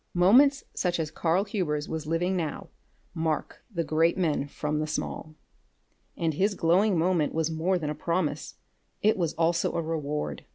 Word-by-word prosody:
Moments 260 +11 +5
such 175 -2 -1
as 155 -2 -2
Karl 170 +4 +1
Hubers 165 -8 -2
was 160 -1 -4
living 175 +4 0
now 165 -4 -3 0.4
mark 160 -2 -2
the 170 -4 -1
great 160 +3 +2
man 155 -6 0
from 150 +1 -3
the 155 - -1
small. 155 0 -4 0.8
And 165 -2 0
his 195 +6 +1
glowing 185 +4 +3
moment 165 -3 +1
was 160 0 0
more 170 +4 +1
than 150 -3 -3
a - - -2
promise; 155 -1 -2 0.5
it 215 +1 +4
was 170 -4 -1
also 165 +1 +1
a 170 - 0
reward. 150 -2 -3
165 Hz, 165 wpm, -27 LUFS, 155-180 Hz, 0.8 s, Moments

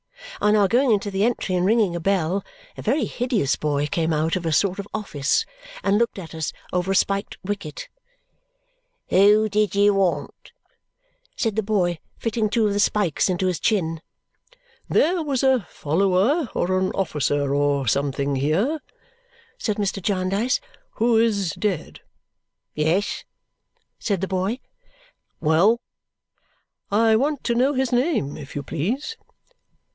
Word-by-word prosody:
On 210 +1 +4
our 205 -2 +4
going 250 +6 +3
into 205 -1 +1
the 195 +1 0
entry 225 -4 0
and 180 -1 +1
ringing 205 -3 +2
a - - -2
bell, 190 +1 0 0.3
a - - -8
very 260 +2 +1
hideous 235 - 0
boy 145 -1 -1
came 160 +2 -1
out 155 +1 +1
of 185 - -3
a - - 0
sort 190 +4 +1
of 200 - -5
office 150 -10 0 0.4
and 200 +2 +3
looked 235 -2 0
at 170 -4 -8
us 160 -2 -3 0.2
over 180 +1 0
a - - +1
spiked 200 +1 0
wicket. 185 -6 -5 1.2
"Who 210 +3 +5
did 210 -1 0
you 205 0 +4
want?" 180 -7 -1 0.8
said 225 -4 -1
the 220 - +1
boy, 185 -5 0 0.2
fitting 225 -1 -1
two 225 0 +2
of 205 - +1
the 205 - 0
spikes 200 -4 +1
into 185 0 0
his 180 -2 0
chin. 165 -7 0 0.9
"There 345 +3 +2
was 280 -5 -1
a 260 -6 +3
follower, 195 - +1
or 185 +2 +1
an 185 0 0
officer, 145 -6 0
or 140 -2 +1
something, 140 +2 0
here," 185 - +1 0.8
said 210 -3 -1
Mr. 200 -1 -1
Jarndyce, 195 - 0 0.3
"who 230 0 +2
is 205 -6 +2
dead." 195 -3 -3 0.7
"Yes?" 160 +7 0 0.8
said 200 -5 -1
the 195 - -1
boy. 190 +6 -1 0.8
"Well?" 170 +9 +3 1.1
"I 220 +2 +4
want 280 +4 0
to 240 - +1
know 265 +4 +2
his 260 -1 0
name, 245 - +1
if 140 - -10
you 145 - -3
please?" 240 - -3
195 Hz, 150 wpm, -23 LUFS, 165-225 Hz, 1.2 s, Who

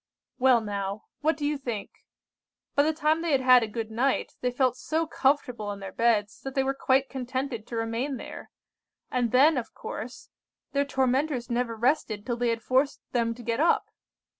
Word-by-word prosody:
"Well 250 -2 +5
now, 200 -1 -4 0.2
what 310 +2 +1
do 295 - -3
you 295 -1 0
think? 235 -6 -4 0.8
By 285 - +4
the 305 +2 +3
time 315 +1 +1
they 335 -3 0
had 270 - +3
had 255 -1 +7
a 225 - -1
good 220 0 -5
night, 255 +4 0
they 250 - +1
felt 250 0 +1
so 320 +5 -1
comfortable 255 -8 0
in 200 - -6
their 195 -1 -7
beds, 220 -3 +1
that 270 -1 -6
they 270 - +3
were 270 0 0
quite 270 0 +2
contented 255 -3 -4
to 235 - -6
remain 230 +4 -2
there; - - -9 0.6
and 245 -3 +1
then, 280 +4 +5
of 235 - -9
course, 240 +3 -7 0.4
their 280 0 +1
tormentors 265 -1 0
never 235 -1 0
rested 225 -3 0
till 240 -1 -2
they 240 0 +1
had 230 -1 -2
forced 265 +4 +2
them 230 -2 0
to 240 - -11
get 230 +1 -1
up! 330 +3 +2
250 Hz, 190 wpm, -27 LUFS, 230-275 Hz, 0.8 s, had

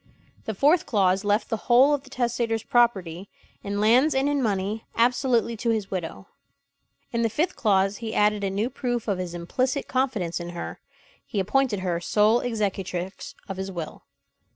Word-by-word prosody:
The 220 - -3
fourth 300 - +3
clause 190 -2 +2
left 205 +2 +1
the 225 - +1
whole 260 +5 +6
of 290 - 0
the 275 - -17
testator's 235 -3 -1
property, 195 -8 +1 0.3
in 200 0 -3
lands 250 +8 +4
and 265 +1 +2
in 290 -1 +1
money, 210 -1 -1
absolutely 240 -1 +2
to 230 +2 -2
his 220 -4 -1
widow. 165 - -5 0.9
In 235 - 0
the 230 - +2
fifth 310 - -1
clause 195 -3 +2
he 225 -2 -5
added 210 0 +2
a 195 - 0
new 210 +6 -1
proof 245 -3 -3
of 200 -3 0
his 175 -1 -4
implicit 255 - -1
confidence 250 -11 -1
in 175 0 -6
her - - -6 0.4
he 205 - -4
appointed 210 +1 +1
her 175 -2 -1
sole 215 +5 +3
executrix 195 -5 -3
of 195 - -5
his 190 0 -4
will. 170 -4 -7
215 Hz, 175 wpm, -25 LUFS, 190-245 Hz, 0.9 s, whole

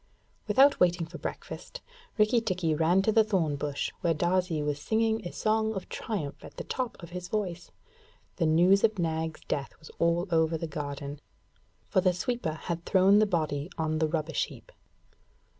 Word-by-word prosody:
Without 270 +7 +5
waiting 175 -1 +3
for 165 - -10
breakfast, - - -7 0.4
Rikki 220 +2 +4
tikki 185 -7 0
ran 165 +5 +3
to 220 - +3
the 220 +1 +5
thorn 180 -9 0
bush 145 0 -3
where 165 -2 +2
Darzee 175 -1 +1
was 145 -1 -2
singing 220 +2 +1
a - - -7
song 220 0 0
of 190 - -6
triumph 170 -11 -4
at - - -12
the - - -4
top 255 -3 -3
of 170 - -9
his 180 0 -6
voice. 180 -4 -3 0.7
The 165 - +2
news 180 +5 +5
of 220 -2 +3
Nag's 160 -2 -2
death 140 -1 -3
was 155 - -14
all 170 +2 +2
over 160 0 +2
the 165 - -4
garden, 145 -1 -5 0.7
for 190 - +2
the 185 -1 +3
sweeper 235 -3 -2
had 170 +1 -5
thrown 195 +3 +5
the 215 - +4
body 155 -4 -1
on 155 -1 0
the 160 - +2
rubbish 155 -2 -1
heap. - - -14
175 Hz, 175 wpm, -29 LUFS, 160-205 Hz, 0.7 s, Without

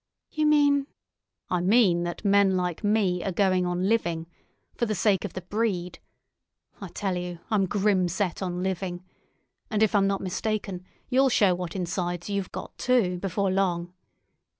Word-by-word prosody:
"You 310 -1 +1
mean——" 285 -2 +4 0.6
"I 180 -1 +1
mean 185 -3 +4
that 175 +5 -6
men 200 -1 +4
like 180 +1 -2
me 205 -4 +1
are 195 - -1
going 185 -1 +2
on 180 +1 -1
living—for 175 +2 -3
the 215 - -1
sake 195 +1 +2
of 205 - -5
the 185 - -6
breed. 185 -3 -2 0.8
I - - -5
tell 195 -3 -3
you, 180 0 -4
I'm 200 -3 +2
grim 195 -2 +2
set 185 +1 -2
on 180 -1 -3
living. 185 -1 -3 0.7
And 215 -1 +2
if 215 - +2
I'm 200 -2 +4
not 195 0 -1
mistaken, 195 -1 -3 0.3
you'll 265 +1 +4
show 205 -6 +4
what 180 0 -5
insides 175 0 -3
you've 200 -2 -2
got, - - -7
too, 215 -8 +2
before 195 +1 -1
long. 180 -2 0
190 Hz, 160 wpm, -26 LUFS, 180-210 Hz, 0.8 s, mean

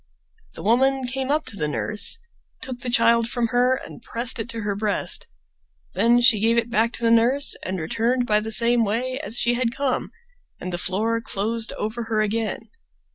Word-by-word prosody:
The - - -8
woman 265 +4 +2
came 260 +1 -3
up 300 +2 0
to - - -7
the 150 -6 -2
nurse, 210 - 0 0.5
took 255 -2 -5
the 245 - -4
child 235 -1 +3
from 240 -2 -1
her, 250 +2 +2
and - - -12
pressed 235 +1 0
it 225 +1 -4
to 230 -1 -5
her 205 -1 -2
breast; 205 0 0 0.7
then 240 +1 +3
she 240 -3 +5
gave 230 +2 +2
it 235 0 0
back 230 +1 +2
to - - -7
the 230 - +3
nurse 245 +5 +3
and 185 0 -3
returned 235 +10 0
by 210 -2 +2
the 215 +1 -5
same 235 +1 +3
way 250 +5 -2
as 225 -2 +2
she 240 - +2
had 240 -1 0
come, 275 -2 -1 0.5
and 185 - -6
the 175 - -3
floor 225 +6 0
closed 225 +2 -1
over 225 +2 -4
her 220 -1 -1
again. 215 +1 -2
230 Hz, 195 wpm, -23 LUFS, 215-245 Hz, 0.7 s, she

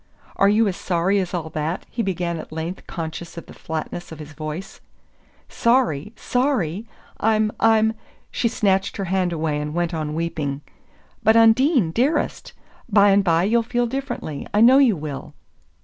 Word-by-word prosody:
"Are 195 - +4
you 215 +2 +3
as 190 - -1
sorry 185 +3 +1
as 185 -2 -2
all 165 -3 -3
that?" 155 +4 -3
he 235 - -3
began 175 -4 -2
at - - -9
length 160 +3 -5
conscious 165 0 -6
of 170 - -7
the - - -13
flatness 160 +2 -6
of 160 - -8
his 150 0 -10
voice. 155 +5 -7 0.7
"Sorry 235 - +1
sorry? 230 - -1 0.3
I'm 215 -1 +2
I'm 220 0 +4 0.2
" - - -35
She 235 - 0
snatched 195 -4 0
her 195 - -2
hand 185 -1 0
away, 155 -2 -1
and 150 +1 -5
went 175 0 -1
on 155 -2 -3
weeping. 150 -4 -3 0.6
"But, 220 +2 +4
Undine 230 - +4
dearest 260 - -1 0.4
bye 205 -1 +5
and 200 0 +4
bye 170 -2 +2
you'll 230 +4 +3
feel 240 +1 -1
differently 240 - -5
I 205 - +1
know 250 +5 +7
you 250 -7 +4
will!" 150 -3 -7
190 Hz, 170 wpm, -22 LUFS, 160-225 Hz, 0.7 s, know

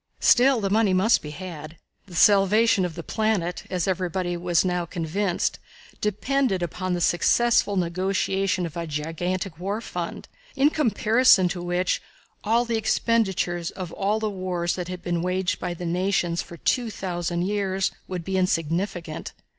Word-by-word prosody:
Still, 255 -1 +5
the 195 -1 -1
money 210 -2 +3
must 210 +5 +4
be 150 - -7
had. 155 -1 -8 0.3
The 180 - -11
salvation 205 +1 +4
of 170 -3 -5
the 170 - -6
planet, 210 -5 -1
as 180 -1 -1
everybody 180 -1 -1
was 175 0 +1
now 180 -1 0
convinced, 175 +2 -1 0.4
depended 210 -1 0
upon 180 +2 -2
the 175 - -3
successful 205 +4 +3
negotiation 185 +1 0
of 165 -1 -7
a 170 -1 -4
gigantic 165 +4 -3
war 200 +4 -2
fund, 175 -7 -6 0.3
in 285 +3 +4
comparison 225 -6 +4
with - - -13
which 175 +1 -1 0.4
all 230 +3 +2
the 230 -1 0
expenditures 190 -7 0
in 185 - -6
all 200 +2 0
of - - -6
the 215 - 0
wars 180 -2 -2
that 180 -2 -4
had 180 -1 -7
been 175 -2 -1
waged 180 +1 -1
by 175 - -3
the 175 - -6
nations 175 -1 0
for 170 - -11
2,000 175 -7 -1
years 195 -1 0 0.2
would 180 -2 -4
be 190 0 -1
insignificant. 170 -1 -2
185 Hz, 155 wpm, -25 LUFS, 175-205 Hz, 0.4 s, Still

